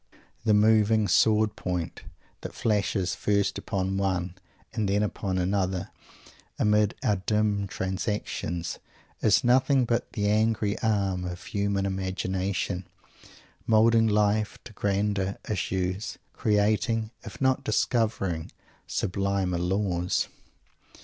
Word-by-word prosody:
The 105 -2 +4
moving 110 0 +4
sword 110 0 +3
point 90 -2 -3 0.4
that - - -7
flashes, 100 -4 0
first 100 +1 0
upon 95 0 -2
one 95 -2 -1 0.4
and 110 -4 -1
then 100 +1 +2
upon 100 -2 -2
another, 95 0 -1 0.7
amid 105 0 +2
our 105 - +2
dim 105 +1 0
transactions, 95 -3 -3 0.4
is - - +4
nothing 130 +1 +4
but 120 0 -1
the 105 -3 0
angry 105 0 +2
arm 100 -4 0
of 90 0 -6
human 100 -1 -1
imagination, 95 -1 -2 0.8
moulding 115 +1 +5
life 105 0 +1
to 120 - -11
grander 100 -1 0
issues; 95 0 -2 0.2
creating, 110 +1 +1
if - - -9
not 130 0 +2
discovering, 105 - 0 0.4
sublimer 95 -2 -1
laws. 90 0 0
100 Hz, 105 wpm, -27 LUFS, 95-110 Hz, 0.8 s, moulding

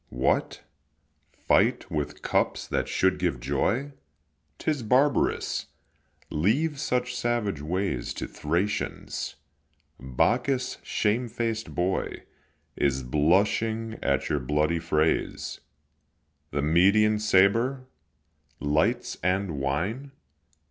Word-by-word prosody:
What, 60 +2 0 0.7
fight - - +1
with 75 -2 -3
cups - - 0
that - - -1
should 95 0 +1
give 85 -9 0
joy? 95 - 0 0.7
'Tis 150 -4 -1
barbarous; 130 +6 +1 0.6
leave 140 - +1
such 125 -1 -1
savage 120 -9 -1
ways 85 -5 -2
To - - -4
Thracians. 85 +7 -2 0.6
Bacchus, 125 - 0
shamefaced 115 0 -1
boy, 90 +2 -1 0.5
Is 65 -2 0
blushing 105 - +1
at 70 -1 0
your 75 - 0
bloody 75 +5 +1
frays. 80 -1 0 0.9
The 70 0 -2
Median 100 +7 +4
sabre! 115 +6 +3 0.7
lights 80 +12 0
and 90 -3 0
wine! 95 - -2
100 Hz, 90 wpm, -27 LUFS, 75-120 Hz, 0.9 s, Median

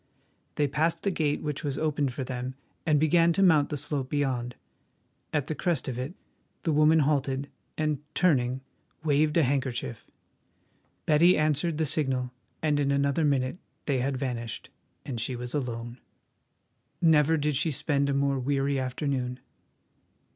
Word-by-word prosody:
They 145 - +2
passed 155 +4 0
the 200 - +1
gate 150 -4 0
which 150 +1 -3
was 140 -2 -2
opened 150 -3 0
for 130 +2 -4
them 125 0 -4 0.3
and 150 -2 +4
began 165 +2 +4
to 195 - +2
mount 155 -6 +5
the 150 - -2
slope 135 -2 -2
beyond. 125 -4 -1 0.8
At 150 -3 0
the 155 - -3
crest 170 -2 -1
of 125 -2 -3
it 135 +8 -4 0.5
the 165 - +1
woman 155 +2 +5
halted 140 -1 0 0.3
and, 155 -2 0 0.2
turning, 130 -7 +2 0.4
waved 150 +1 +2
a 165 - +5
handkerchief. 125 - -2 1.0
Betty 170 +4 +5
answered 155 +1 +1
the 160 - +1
signal, 130 -4 -1 0.3
and 150 -2 +2
in 140 -1 +1
another 140 +2 +1
minute 140 +2 +1 0.3
they 135 -3 +1
had 135 +1 -1
vanished, 120 -3 -4 0.3
and 120 -5 -4
she 125 +3 -2
was 125 0 -6
alone. 120 -3 -4 1.0
Never 160 -1 +4
did 150 -1 0
she 150 +5 +1
spend 140 -1 0
a - - +1
more 140 -1 +1
weary 140 +1 0
afternoon. 130 -1 -2
140 Hz, 155 wpm, -28 LUFS, 130-155 Hz, 1.0 s, mount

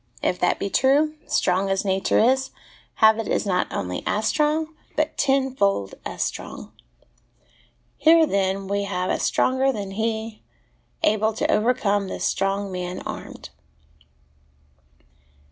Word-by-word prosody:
If 180 - 0
that 180 - +2
be 200 - -4
true, 290 +4 +3
strong 185 +2 +1
as 195 +1 0
nature 190 0 +1
is, 265 +3 +3 0.5
habit 220 0 +4
is - - 0
not 185 -3 0
only 90 -2 -3
as 215 +1 0
strong, 310 +1 0 0.2
but 310 0 0
tenfold 265 - +1
as - - -3
strong. - - -6 1.3
Here, 320 +2 +6
then, 195 -5 0
have 200 -2 -2
we - - +2
a - - -2
stronger 260 +1 +2
than 200 -5 -5
he, 220 +1 -3 0.6
able 215 +1 +2
to - - 0
overcome 210 -3 +1
this - - -4
strong 195 0 -1
man 180 0 -5
armed. - - -8
215 Hz, 130 wpm, -23 LUFS, 195-265 Hz, 1.3 s, Here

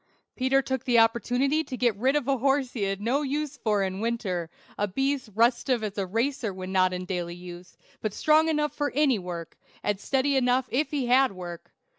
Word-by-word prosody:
Peter 270 +1 +2
took 265 -1 -3
the 245 -2 +3
opportunity 245 +6 +2
to 260 -5 -6
get 240 -4 +2
rid 260 +7 +1
of 290 -3 0
a 275 -1 +2
horse 270 0 +1
he 230 - -4
had 195 0 -1
no 240 +7 0
use 295 0 -2
for 210 -5 +1
in 190 0 -3
winter; 205 -7 -2 0.3
a 205 - 0
beast 270 +4 -1
restive 235 +1 +2
as 205 -2 -3
a 195 -2 -2
racer 230 +3 -1
when 185 0 -7
not 185 -1 +3
in 180 0 -4
daily 175 -2 -3
use, 175 0 -11 0.2
but 215 - -1
strong 310 +8 +3
enough 300 -1 0
for 290 -1 -1
any 275 -6 +3
work, 175 -2 -7 0.2
and 205 -2 0
steady 275 +4 +1
enough 255 0 +2
if 295 +5 +1
he 285 -4 -1
had 255 -1 +4
work. 175 -2 -8
240 Hz, 205 wpm, -27 LUFS, 195-270 Hz, 0.3 s, had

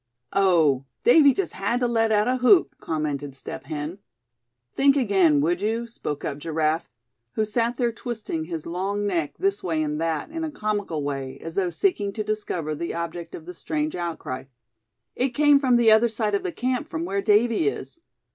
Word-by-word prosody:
"Oh! 165 -9 +3 0.2
Davy 285 +3 +7
just 390 +6 -2
had 205 +6 -1
to 245 - +3
let 225 -1 +1
out 210 +1 +3
a 255 +1 +2
whoop!" 300 +9 +5
commented 145 -3 -3
Step 135 0 -8
Hen. 155 +5 -5 0.7
"Think 275 0 +4
again, 190 - +3
would 175 +4 +1
you," 225 +3 -1
spoke 150 -11 -5
up 140 0 -3
Giraffe, 160 0 -1 0.4
who 215 - 0
sat 235 +2 0
there 240 -2 +1
twisting 220 -9 -5
his 165 -2 -5
long 195 +4 -2
neck 165 -7 -1
this 195 +1 0
way 160 -4 -1
and 150 +1 -2
that, 165 - -2
in 325 0 -4
a 320 - -2
comical 205 - -2
way, 135 -2 -4
as 165 - -8
though 185 -1 0
seeking 205 - 0
to 215 - -3
discover 205 -7 -3
the 170 +3 -4
object 170 0 -5
of 160 - -10
the 180 - -8
strange 305 - -3
outcry; 160 -7 -4 0.7
"it 250 -1 -1
came 290 0 +5
from 260 -3 +3
the 235 -2 +5
other 220 +2 +5
side 215 -1 -1
of 200 - +1
the 180 - -3
camp 250 +3 -2
from 165 +1 -3
where 200 +2 -1
Davy 220 - +3
is." 420 - -4
200 Hz, 190 wpm, -24 LUFS, 160-235 Hz, 0.7 s, Davy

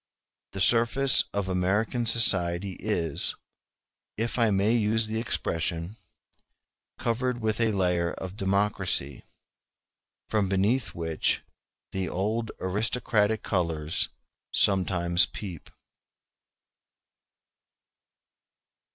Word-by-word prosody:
The 95 - -6
surface 120 +6 +5
of 100 -2 -2
American 100 +6 0
society 95 -5 +3
is, 85 -8 +1 0.8
if 115 +3 -2
I 115 -1 +3
may 100 +2 +2
use 110 -1 +1
the 110 +1 -3
expression, 85 -4 -2 1.0
covered 120 +1 -2
with 110 0 -1
a 115 -1 +2
layer 90 -3 0
of 95 0 -7
democracy, 95 -7 -1 1.1
from 105 -3 0
beneath 105 +7 0
which 80 -2 -1 0.5
the 95 -1 -3
old 110 +4 -2
aristocratic 105 +2 0
colors 85 -4 -1 0.4
sometimes 90 -3 +3
peep. 90 -7 -9
100 Hz, 85 wpm, -27 LUFS, 90-110 Hz, 1.1 s, surface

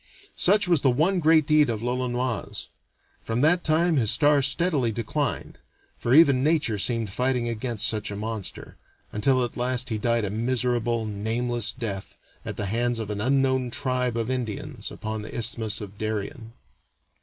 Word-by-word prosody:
Such 200 +1 +3
was 170 -5 +3
the 135 - +3
one 160 +9 +2
great 160 -1 +4
deed 150 -1 +4
of 110 -1 -3
l'Olonoise; 125 -4 -3 0.5
from 115 +2 -2
that 170 +4 +3
time 160 +1 +2
his 115 -5 +2
star 145 +1 +4
steadily 135 -3 +1
declined 120 +6 -3 0.4
for 120 +2 +2
even 140 -5 +6
nature 150 -9 +1
seemed 115 -1 0
fighting 125 +2 0
against 115 -1 -1
such 110 -2 -1
a 100 - -5
monster 110 -1 -5 0.3
until 130 +4 +2
at 120 - -8
last 125 +1 0
he 110 -2 -2
died 115 0 +1
a 100 - -3
miserable, 120 0 0
nameless 110 +2 -1
death 100 -5 -6 0.3
at - - -6
the 100 - -2
hands 120 +4 0
of 110 -2 -4
an 105 0 -3
unknown 130 0 +1
tribe 125 -1 0
of 115 +2 -1
Indians 120 -5 -4
upon 110 0 -5
the 105 - -7
Isthmus 115 -1 0
of 100 0 -9
Darien. 110 +2 -4
120 Hz, 165 wpm, -25 LUFS, 110-135 Hz, 0.5 s, even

